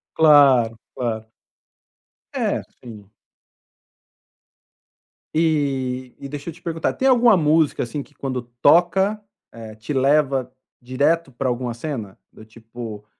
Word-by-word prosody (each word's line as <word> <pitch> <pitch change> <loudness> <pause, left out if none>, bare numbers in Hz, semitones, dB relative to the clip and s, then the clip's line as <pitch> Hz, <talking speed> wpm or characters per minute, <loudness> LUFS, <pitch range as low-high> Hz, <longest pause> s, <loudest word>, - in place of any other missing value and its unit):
Claro, 140 -7 +5 0.2
claro. 110 -3 -4 1.0
É, - - -1 0.2
sim. 105 -5 -12 2.2
E 135 -5 -1
e 140 - -7
deixa 145 +3 -6
eu - - -7
te - - -19
perguntar, 165 -1 -2
tem 265 - 0
alguma 240 -4 +5
música, 155 -1 +2
assim, 125 +5 -5
que 145 - -16
quando 130 -2 -4 0.2
toca, 190 +7 +3 0.3
eh, 110 -2 -10
te 110 +7 -6
leva 135 -1 +1 0.3
direto 140 +4 0
para 130 +1 -2
alguma 120 -1 -3
cena? 115 -7 -6
Do 110 - -15
tipo 110 -1 -10
135 Hz, 120 wpm, -21 LUFS, 120-155 Hz, 2.2 s, Claro